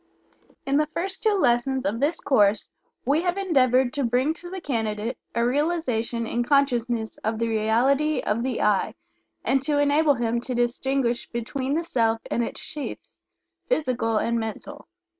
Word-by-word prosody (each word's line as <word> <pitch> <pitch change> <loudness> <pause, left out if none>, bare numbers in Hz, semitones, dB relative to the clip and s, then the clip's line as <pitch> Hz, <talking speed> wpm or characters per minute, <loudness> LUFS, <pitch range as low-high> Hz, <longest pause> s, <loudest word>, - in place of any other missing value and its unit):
In 275 +1 +2
the 305 0 +2
first 380 +3 -3
two 430 -2 +3
lessons 260 -4 +1
of 210 +4 -1
this 290 +5 +1
course 210 -6 +2 0.3
we 285 +5 +2
have 355 +1 -1
endeavored 260 -9 +3
to 285 - -1
bring 250 +5 +1
to 350 +1 -10
the 380 +1 -5
candidate 225 -5 -2 0.2
a 235 0 +2
realization 250 -5 0
in 235 +1 -1
consciousness 240 -4 +1
of 220 +1 -2
the 230 +1 0
reality 245 +8 +2
of 210 +2 -1
the 255 -1 -1
"I," 210 -2 +1 0.5
and 270 0 +2
to 290 +1 0
enable 290 +1 +3
him 235 -1 -1
to 250 +1 -4
distinguish 245 0 0
between 260 +4 -3
the 335 - 0
Self 225 -7 +1
and 235 - +1
its - - -5
sheaths, 295 -2 -7 0.5
physical 255 - +1
and 235 +2 0
mental. 230 +7 -6
255 Hz, 160 wpm, -25 LUFS, 230-290 Hz, 0.5 s, two